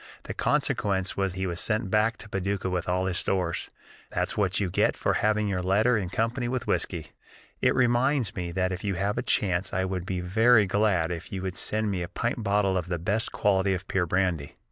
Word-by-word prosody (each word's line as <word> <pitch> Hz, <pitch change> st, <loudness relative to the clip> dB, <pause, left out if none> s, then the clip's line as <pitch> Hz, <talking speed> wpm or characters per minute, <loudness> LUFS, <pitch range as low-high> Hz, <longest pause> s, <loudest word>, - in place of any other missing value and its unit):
The -, -, -5 dB
consequence 95 Hz, -2 st, 0 dB
was 95 Hz, -2 st, 0 dB
he 95 Hz, 0 st, -3 dB
was 85 Hz, -1 st, -2 dB
sent 110 Hz, -3 st, 0 dB
back 110 Hz, +1 st, +2 dB
to -, -, -11 dB
Paducah 95 Hz, -1 st, -2 dB
with 90 Hz, -1 st, -2 dB
all 90 Hz, +1 st, +1 dB
his 95 Hz, -1 st, 0 dB
stores. 90 Hz, -3 st, -1 dB, 0.4 s
That's -, -, -1 dB
what 95 Hz, -3 st, +1 dB
you 100 Hz, -, 0 dB
get -, -, +2 dB
for -, -, +1 dB
having 105 Hz, 0 st, +1 dB
your 95 Hz, -2 st, -1 dB
letter 105 Hz, +7 st, +3 dB
in 95 Hz, -5 st, -1 dB
company 115 Hz, +6 st, -1 dB
with 125 Hz, 0 st, -2 dB
whiskey! 80 Hz, -4 st, -1 dB, 0.5 s
It -, -, +3 dB
reminds 125 Hz, -2 st, +2 dB
me 90 Hz, -2 st, -3 dB
that 95 Hz, 0 st, 0 dB
if 90 Hz, -, -5 dB
you 100 Hz, -2 st, -1 dB
have 100 Hz, +4 st, -1 dB
a -, -, 0 dB
chance 95 Hz, -1 st, 0 dB
I 95 Hz, +1 st, +1 dB
would 95 Hz, -1 st, -3 dB
be 95 Hz, -1 st, -2 dB
very 110 Hz, +5 st, +4 dB
glad 95 Hz, -4 st, +1 dB
if 85 Hz, 0 st, -6 dB
you 95 Hz, -1 st, -4 dB
would 95 Hz, -1 st, -3 dB
send 110 Hz, +2 st, 0 dB
me 95 Hz, -2 st, -2 dB
a 85 Hz, -, -3 dB
pint -, -, -2 dB
bottle 100 Hz, -1 st, +2 dB
of 85 Hz, -, -6 dB
the 90 Hz, -1 st, -1 dB
best 100 Hz, +7 st, -1 dB
quality 95 Hz, -2 st, +2 dB
of 95 Hz, +1 st, -7 dB
pure 90 Hz, -2 st, 0 dB
brandy. 90 Hz, -5 st, 0 dB
95 Hz, 220 wpm, -27 LUFS, 90-105 Hz, 0.5 s, very